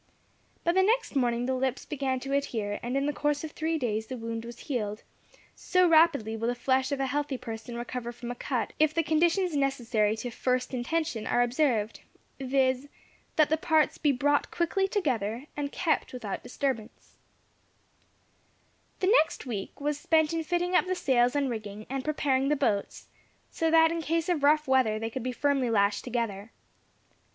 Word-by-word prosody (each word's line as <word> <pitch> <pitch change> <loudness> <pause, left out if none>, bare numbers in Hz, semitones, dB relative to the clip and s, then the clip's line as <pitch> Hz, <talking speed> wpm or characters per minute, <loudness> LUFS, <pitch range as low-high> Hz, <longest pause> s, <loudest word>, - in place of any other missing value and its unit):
By 340 - +3
the 380 +2 +3
next 445 -2 +1
morning 240 -2 +1
the 260 - 0
lips 260 0 -1
began 270 -3 -2
to 275 +1 -4
adhere, 220 -7 -1
and 245 +3 -2
in 275 - 0
the 295 - 0
course 295 0 -1
of 315 - -5
three 320 +1 -1
days 220 -5 -2
the 255 - -5
wound 230 0 -5
was 235 0 -9
healed 215 -6 -3 0.5
so 365 -1 +2
rapidly 315 -9 +4
will 225 +1 -2
the 245 - 0
flesh 260 +2 +1
of 280 - -1
a 270 - +1
healthy 285 0 -2
person 225 0 -7
recover 240 0 -5
from 240 0 -7
a - - -5
cut 240 -3 -2
if 310 0 +3
the 330 - +2
conditions 335 +3 +2
necessary 240 -6 +1
to 245 +2 -5
"first 255 +2 -1
intention" 255 -1 -2
are 245 - +3
observed, 240 -4 0 0.4
viz., 260 0 +1 0.5
that 310 -2 +4
the 315 - +4
parts 315 -2 +2
be 295 - +3
brought 285 +2 +1
quickly 385 +3 0
together, 255 - -1
and 285 -1 -3
kept 330 -6 0
without 220 -6 -5
disturbance. 245 -2 -4 1.8
The 380 +3 +4
next 315 - -5
week 210 -6 -5
was 290 0 -1
spent 315 0 +2
in 330 0 -1
fitting 350 +2 -1
up 365 - +3
the 370 - 0
sails 250 -5 +2
and 285 -1 +1
rigging, 215 -3 -6
and 270 -1 -2
preparing 275 -2 +1
the 300 - +3
boats, 225 -8 -1 0.5
so 325 - 0
that 325 0 +5
in 335 0 -2
case 330 +2 -1
of 340 -5 +1
rough 300 +1 +4
weather 260 -5 +3
they 225 +1 -4
could 260 - -4
be 255 +2 -2
firmly 270 -1 +1
lashed 200 -2 +2
together. 225 -4 -3
265 Hz, 180 wpm, -28 LUFS, 235-310 Hz, 1.8 s, that